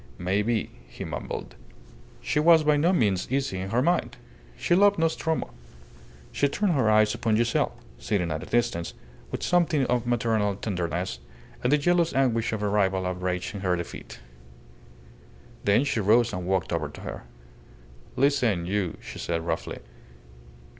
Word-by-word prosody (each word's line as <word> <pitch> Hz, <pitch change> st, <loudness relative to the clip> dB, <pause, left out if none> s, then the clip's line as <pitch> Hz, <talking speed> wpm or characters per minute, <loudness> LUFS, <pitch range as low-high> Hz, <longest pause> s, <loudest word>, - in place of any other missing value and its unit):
May 95 Hz, +3 st, 0 dB
be," 110 Hz, 0 st, -1 dB, 0.2 s
he -, -, -8 dB
mumbled. -, -, -5 dB, 0.7 s
She 150 Hz, -, 0 dB
was 160 Hz, 0 st, +6 dB
by 150 Hz, 0 st, +4 dB
no 160 Hz, +5 st, +3 dB
means 105 Hz, -, +1 dB
easy 130 Hz, -8 st, -1 dB
in 95 Hz, +1 st, -4 dB
her 120 Hz, +4 st, +1 dB
mind. 175 Hz, +3 st, 0 dB, 0.4 s
She -, -, 0 dB
loved 200 Hz, +2 st, +5 dB
Nostromo. 160 Hz, -, -1 dB, 0.8 s
She 140 Hz, -, +2 dB
turned 190 Hz, +6 st, 0 dB
her 130 Hz, -7 st, +2 dB
eyes 110 Hz, 0 st, +4 dB
upon 115 Hz, -2 st, 0 dB
Giselle, 115 Hz, 0 st, +1 dB, 0.2 s
sitting 90 Hz, -6 st, -1 dB
at 80 Hz, -, -3 dB
a -, -, -9 dB
distance, 100 Hz, -8 st, -1 dB, 0.3 s
with -, -, -5 dB
something 165 Hz, -6 st, +2 dB
of 125 Hz, -1 st, 0 dB
maternal 110 Hz, -4 st, +1 dB
tenderness, 90 Hz, -3 st, -3 dB, 0.4 s
and 125 Hz, -, +1 dB
the 150 Hz, -, +5 dB
jealous 170 Hz, +2 st, +2 dB
anguish 120 Hz, -4 st, +1 dB
of 110 Hz, -2 st, -3 dB
a -, -, +1 dB
rival 95 Hz, -2 st, +1 dB
outraged 90 Hz, 0 st, -2 dB
in 100 Hz, -, -6 dB
her 90 Hz, -2 st, +1 dB
defeat. 85 Hz, -1 st, -7 dB, 1.5 s
Then 100 Hz, +6 st, +4 dB
she 140 Hz, -, -1 dB
rose 115 Hz, +3 st, +3 dB
and 90 Hz, -1 st, -4 dB
walked 95 Hz, -2 st, 0 dB
over 80 Hz, -3 st, -1 dB
to 75 Hz, -, -12 dB
her. -, -, -7 dB, 0.9 s
"Listen 125 Hz, -10 st, +2 dB
you," 95 Hz, -1 st, -1 dB
she -, -, -9 dB
said, 85 Hz, -1 st, -2 dB
roughly. 80 Hz, -1 st, -3 dB
110 Hz, 160 wpm, -26 LUFS, 95-140 Hz, 1.5 s, was